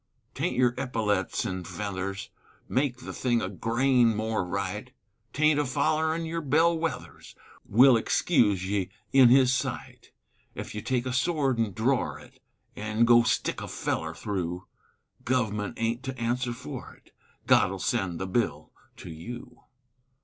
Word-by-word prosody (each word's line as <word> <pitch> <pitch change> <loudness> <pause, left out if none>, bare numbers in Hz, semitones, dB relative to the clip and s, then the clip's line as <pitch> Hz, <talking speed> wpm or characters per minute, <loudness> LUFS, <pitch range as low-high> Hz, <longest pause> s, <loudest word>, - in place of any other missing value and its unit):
'Taint - - -2
your 125 -1 +4
eppyletts 105 -7 -1
an' 95 -1 -4
feathers 100 0 -5 0.4
Make 130 -2 0
the - - -7
thing 120 -2 +1
a 95 - -3
grain 115 +3 +2
more 110 -1 -1
right; 90 - -4 0.4
'Taint 155 0 +3
afollerin' 155 +4 0
your 165 +1 -3
bell 160 +4 +3
wethers 165 0 -5 0.3
Will 125 +4 +6
excuse 105 - +2
ye 100 -2 -1 0.2
in 130 -3 +8
His 130 0 +5
sight; 130 - -4 0.5
Ef - - -6
you 105 - -4
take 125 +2 -1
a 130 - -2
sword 135 -2 +1
an' 110 -4 0
dror 125 +6 0
it, - - -17 0.3
An' 110 +2 +1
go 120 0 +7
stick 115 0 0
a - - -5
feller - - -3
thru, 90 -3 -4 0.6
Guv'ment 110 -3 -1
aint 115 +2 -1
to 130 0 -6
answer 120 +1 -1
for 95 -10 -8
it, - - -26 0.3
God'll 95 +1 +4
send 95 -5 -1
the 95 - -2
bill 110 +5 -1 0.3
to 85 - -9
you. 100 +10 -9
120 Hz, 145 wpm, -27 LUFS, 105-130 Hz, 0.6 s, in